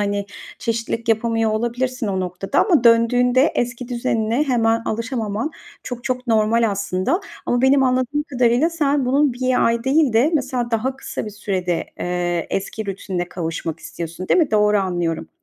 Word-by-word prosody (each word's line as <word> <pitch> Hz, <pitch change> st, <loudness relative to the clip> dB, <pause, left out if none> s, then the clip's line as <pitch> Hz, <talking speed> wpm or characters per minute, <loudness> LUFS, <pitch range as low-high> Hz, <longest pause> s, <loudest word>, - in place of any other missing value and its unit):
hani, 200 Hz, 0 st, -1 dB, 0.3 s
çeşitlilik 230 Hz, 0 st, -3 dB
yapamıyor 225 Hz, 0 st, +1 dB
olabilirsin 240 Hz, +2 st, -1 dB
o 190 Hz, -2 st, -1 dB
noktada 185 Hz, +1 st, 0 dB
ama 325 Hz, -, +3 dB
döndüğünde 245 Hz, +3 st, +4 dB
eski 240 Hz, 0 st, -2 dB
düzenine 235 Hz, +1 st, 0 dB
hemen 230 Hz, -4 st, +2 dB
alışamaman 225 Hz, +2 st, -2 dB, 0.3 s
çok 245 Hz, 0 st, -7 dB
çok 255 Hz, 0 st, -2 dB
normal 225 Hz, 0 st, +3 dB
aslında 200 Hz, -, -1 dB, 0.3 s
ama 245 Hz, +1 st, +1 dB
benim 270 Hz, +1 st, +5 dB
anladığım 255 Hz, +3 st, +1 dB
kadarıyla 255 Hz, +1 st, +2 dB
sen 290 Hz, -4 st, +1 dB
bunun 275 Hz, +1 st, +3 dB
1 255 Hz, +1 st, +1 dB
ay 230 Hz, +1 st, 0 dB
değil 275 Hz, -2 st, +3 dB
de 240 Hz, +8 st, +4 dB
mesela 255 Hz, -4 st, -1 dB
daha 250 Hz, +4 st, -1 dB
kısa -, -, -5 dB
bir -, -, -5 dB
sürede, 185 Hz, -4 st, -2 dB
eee, 175 Hz, -1 st, -1 dB
eski 205 Hz, +2 st, -3 dB
rutinine 185 Hz, -2 st, -4 dB
kavuşmak 165 Hz, -2 st, -4 dB
istiyorsun 170 Hz, +2 st, -7 dB
değil 365 Hz, -, +4 dB
mi? 305 Hz, -, +1 dB
Doğru 210 Hz, -1 st, +3 dB
anlıyorum. 175 Hz, -4 st, -2 dB
230 Hz, 155 wpm, -21 LUFS, 200-255 Hz, 0.3 s, benim